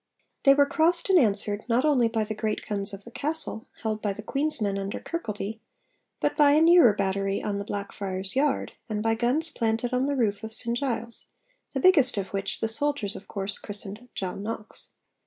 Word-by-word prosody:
They 275 0 +8
were 285 0 +5
crossed 340 +5 +2
and 370 - +7
answered, 205 -3 +1
not 240 +5 +2
only 265 -6 +4
by 225 -1 -1
the 215 +1 -4
great 215 0 -3
guns 200 -1 0
of 195 0 -8
the 235 - -12
castle, 300 -5 -1 0.2
held 215 -1 -2
by 205 -2 -1
the 215 - -9
Queen's 285 +6 +1
Men 200 -2 -1
under 195 +1 -4
Kirkaldy, 220 -9 -5 0.6
but - - 0
by 290 -1 +5
a 300 - +5
nearer 335 -7 +7
battery 195 0 -1
on 200 -1 -2
the - - -3
Blackfriars' 200 -1 -4
Yard, 285 +1 +1 0.2
and 210 -1 -2
by 225 0 +2
guns 255 +8 +1
planted 230 +1 -1
on 255 +2 +1
the 285 - 0
roof 215 -5 0
of 220 0 -3
St 235 -1 +1
Giles 235 -3 -2 0.5
(the - - +1
biggest 295 - +5
of 195 -1 -2
which 195 0 -4
the 225 - +1
soldiers 230 -3 0
of 195 - -10
course 195 0 -1
christened 205 +4 -2
'John 190 0 -4
Knox'). 215 0 -4
225 Hz, 200 wpm, -26 LUFS, 200-275 Hz, 0.6 s, They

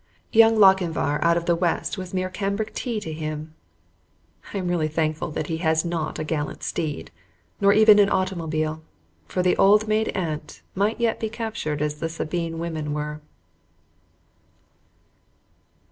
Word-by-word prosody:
Young 225 0 +6
Lochinvar 180 -7 +3
out 170 0 +4
of 170 - -2
the 170 - +3
west 170 0 -1
was 185 -2 -7
mere 185 0 -2
cambric 200 +2 -2
tea 235 -4 -3
to 160 -6 -5
him. 155 0 -5 1.0
I - - -4
am 185 -2 -2
really 170 -3 +1
thankful 155 +1 -1
that 155 - -3
he 160 +1 -3
has 160 0 +1
not 165 -2 -3
a - - -3
gallant 150 -1 -3
steed, 150 - -3 0.5
nor 200 0 +5
even 215 0 +7
an 200 -1 +5
automobile, 160 -4 -1 0.5
for 180 - -1
the 180 - +3
old 210 +2 +5
maid 215 +1 +1
aunt 160 -5 -4
might 205 +4 0
yet 230 -1 +1
be 220 - -2
captured 215 -10 -3
as 150 0 -3
the 165 - -2
Sabine 165 0 -3
women 160 -3 -3
were. 150 0 -4
170 Hz, 155 wpm, -24 LUFS, 155-200 Hz, 1.0 s, even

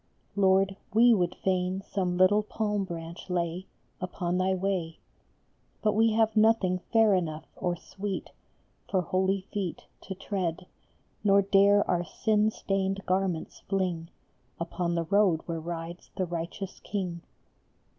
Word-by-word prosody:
Lord, 195 0 +3 0.2
we 235 +1 +7
would 180 -4 +1
fain 185 0 -1
some 180 -3 -1
little 185 +3 +5
palm 210 -1 -1
branch 170 0 -7
lay 175 +1 -2 0.3
Upon 180 0 -2
thy 190 +1 +2
way; 180 -4 -2 0.9
But 210 -1 +3
we 225 +1 +3
have 220 0 +2
nothing 215 -4 +4
fair 225 -2 +5
enough 160 -4 -1
or 175 -1 -1
sweet 195 +3 -5 0.6
For 190 - +2
holy 190 +2 +1
feet 190 -5 -3 0.2
To 190 - -4
tread, 185 -3 -3 0.6
nor 200 -1 +5
dare 200 +1 +5
our 175 -1 +1
sin 215 +3 +1
stained 195 -2 -2
garments 185 -3 -1
fling 180 -4 -1 0.5
Upon 170 0 -2
the 170 - +1
road 190 -3 +3
where 165 -1 -3
rides 170 +1 -6
the 185 - +1
Righteous 175 +3 -5
King. 180 -4 -4
190 Hz, 135 wpm, -28 LUFS, 175-200 Hz, 0.9 s, we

